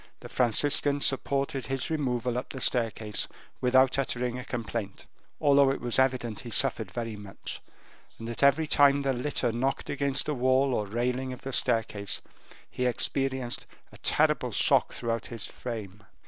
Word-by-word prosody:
The - - -9
Franciscan 140 +4 +2
supported 135 0 +1
his 135 +4 -2
removal 125 -5 -1
up 125 - -3
the 135 - -6
staircase 110 -4 0 0.3
without 130 +1 +4
uttering 125 -2 -2
a - - -6
complaint, 115 -5 -5 0.3
although 140 -2 +5
it 135 - -1
was 120 +1 0
evident 125 -4 +1
he 120 - -8
suffered 115 -3 +2
very 115 +2 -4
much, 100 -1 -8 0.6
and 115 - -7
that 120 - -4
every 140 +3 +4
time 140 -1 +4
the 135 -1 +1
litter 125 -1 -1
knocked 130 +4 -2
against 140 -1 0
the 150 - -1
wall 130 +1 +2
or 105 -3 -1
the 105 - -10
railing 125 +2 -1
of 125 - -10
the 135 - -6
staircase, 105 -4 0 0.4
he 125 - -2
experienced 130 0 -1 0.2
a - - -15
terrible - - +2
shock - - +3
throughout 115 -1 -3
his 115 -4 -4
frame. 105 -4 -7
125 Hz, 160 wpm, -28 LUFS, 115-135 Hz, 0.6 s, although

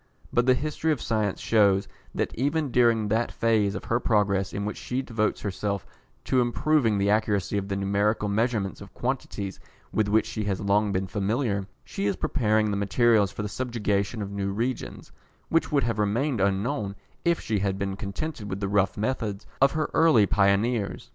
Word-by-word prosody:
But 120 +1 +2
the 130 - +6
history 155 +4 -1
of 150 - 0
science 110 -4 -1
shews 100 -3 +3 0.3
that - - -1
even 145 +2 0
during 115 -3 +3
that 115 +3 +1
phase 110 -4 +1
of 95 - -5
her 115 - +1
progress 100 -5 +1
in 100 +3 -3
which 105 - -4
she 130 +2 -3
devotes 110 -4 -1
herself 100 0 -3 0.4
to 130 - +2
improving 120 -2 +2
the 100 +1 +2
accuracy 105 -3 +1
of 100 - -6
the 100 - -2
numerical 100 +2 +1
measurement 105 -2 -1
of 100 -2 -12
quantities 115 -6 -3 0.3
with 110 -1 +1
which 110 +2 +3
she 110 -2 -4
has 100 -2 -1
long 105 +1 +2
been 95 0 0
familiar, 100 +1 -1 0.2
she 100 - -3
is 100 - +1
preparing 110 +2 +1
the 100 - -1
materials 105 0 +3
for 105 - -5
the - - -2
subjugation 105 -2 -1
of 100 - -6
new 100 -1 -2
regions, 120 +5 -4 0.4
which 165 0 +1
would 140 -2 +3
have 115 -2 -1
remained 115 +4 0
unknown 100 +2 0 0.3
if 170 -1 +2
she 105 -2 -1
had 95 0 -1
been 100 -1 -2
contented 105 +4 -5
with 95 +1 -4
the 100 - -1
rough 100 -1 +1
methods 105 -3 -2 0.2
of 135 0 +5
her 155 -1 -1
early 155 -11 +5
pioneers. 100 +2 +1
105 Hz, 185 wpm, -26 LUFS, 100-120 Hz, 0.4 s, the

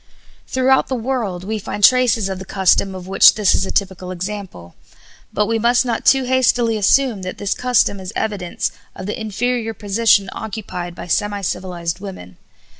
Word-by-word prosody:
Throughout 260 +1 +2
the 260 - -2
world 225 -7 -3
we 215 +3 -3
find 205 +1 -6
traces 245 -4 +4
of 190 -1 -5
the - - -7
custom 190 0 +1
of 185 -1 -8
which 195 - +6
this 210 -3 +3
is 190 - 0
a - - -4
typical 190 -2 -2
example, 185 - -7 0.6
but 210 - +1
we 225 +1 -1
must 240 +3 +3
not 235 -2 -2
too 270 -1 +5
hastily 245 -2 +2
assume 220 +1 +2
that 185 0 -6
this 205 - -1
custom 245 -5 +1
is 185 0 -7
evidence 205 -5 -2 0.2
of 185 - -7
the 210 +2 -4
inferior 225 +1 -2
position 205 -1 +2
occupied 190 -5 -6
by - - -8
semi 205 +3 -1
civilized 180 -2 -4
women. 185 - -10
205 Hz, 175 wpm, -19 LUFS, 185-230 Hz, 0.6 s, which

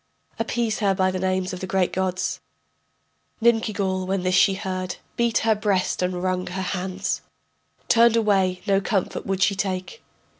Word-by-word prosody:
Appease 225 0 -1
her 200 -3 +2
by 185 0 +2
the 185 - -3
names 185 0 -1
of 180 - -5
the 185 - -5
great 190 -1 +1
gods... 185 0 -1 1.0
Ninkigal, 215 -5 +1
when 190 -1 -1
this 185 0 +1
she 195 +1 +5
heard, 185 -1 -4 0.2
Beat 235 -1 +2
her 225 - +5
breast 205 -4 0
and 180 0 -1
wrung 185 -1 -1
her 185 +2 -4
hands, 185 +1 -2 0.7
Turned 235 0 +5
away, 195 -5 +2
no 195 -1 +2
comfort 195 -2 -2
would 190 -1 +1
she 200 - +3
take. 190 - -3
190 Hz, 160 wpm, -24 LUFS, 185-210 Hz, 1.0 s, she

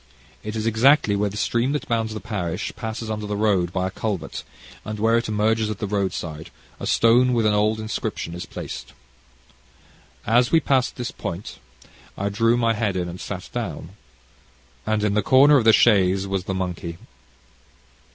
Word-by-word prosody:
It 105 +1 -5
is 110 0 -2
exactly 115 0 +4
where 100 +1 0
the - - -11
little 105 - -1
stream 120 +3 0
that 150 - -3
bounds 115 -2 -1
the - - -4
parish 90 -8 -4
passes 110 0 -5
under 105 -1 -4
the 105 - -2
road 100 -5 +1
by 95 0 -1
a - - -5
culvert, 105 -3 -4 0.4
and 110 0 -5
where 110 +2 +2
it 115 - 0
emerges 110 +1 +1
at 105 - -4
the 105 - -3
road 100 -2 0
side, 80 -1 -6 0.3
a - - -4
stone 125 +2 +4
with 115 -2 +2
an 105 - +3
old 105 +1 +1
inscription 110 -5 -4
is 90 +1 -7
placed. - - -7 1.3
As 120 +3 +3
we 165 - +6
passed 135 -4 +1
this 125 -1 -4
point, 85 +4 -6 0.6
I 100 +1 -1
drew 115 +4 +2
my 115 -1 +2
head 105 -3 -1
in 90 -1 -1
and 85 +1 -8
sat - - -6
down, 80 - -4 1.0
and 110 -1 +1
in 105 -1 +1
the 105 - +2
corner 135 +7 +6
of 120 - +1
the 110 - +8
chaise 95 -4 +4
was 95 -1 -2
the 95 - -3
monkey. 90 -2 -4
105 Hz, 190 wpm, -23 LUFS, 95-115 Hz, 1.3 s, the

